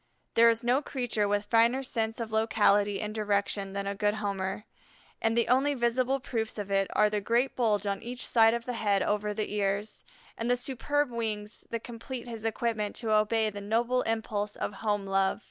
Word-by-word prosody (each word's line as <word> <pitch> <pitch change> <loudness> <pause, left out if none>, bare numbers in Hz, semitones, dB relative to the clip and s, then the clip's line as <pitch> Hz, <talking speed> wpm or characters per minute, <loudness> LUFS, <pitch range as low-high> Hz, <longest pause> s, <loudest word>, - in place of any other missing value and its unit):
There 230 0 +6
is 230 0 +1
no 250 +4 +2
creature 245 -7 -1
with 205 0 0
finer 235 +4 +3
sense 225 -3 -2
of 225 -2 -4
locality 205 -2 +2
and 210 -1 -3
direction 200 -2 -1
than 200 0 -3
a 200 - -1
good 205 +1 0
Homer, 200 -1 -3 0.6
and 225 +1 +1
the 235 - +3
only 275 +3 +3
visible 255 +2 +1
proofs 225 -4 -3
of 200 -1 -5
it 195 -1 +2
are 210 - +4
the 210 0 -1
great 235 +6 +1
bulge 215 -4 +1
on 200 -1 -2
each 245 +2 -4
side 225 -1 +5
of 235 0 -5
the 250 - -3
head 205 -4 +1
over 210 0 0
the 210 0 -3
ears, 205 +1 -1 0.4
and 230 +1 -1
the 245 - +3
superb 275 +2 -1
wings 215 -2 -4
that 230 -1 -4
complete 240 +1 -7
his 225 -2 -7
equipment 225 -2 -1
to 225 -2 -3
obey 215 +1 +2
the 205 0 -7
noble 235 +5 +1
impulse 215 -2 -2
of - - -3
home 205 -2 -1
love. 195 0 +1
220 Hz, 195 wpm, -29 LUFS, 205-235 Hz, 0.6 s, There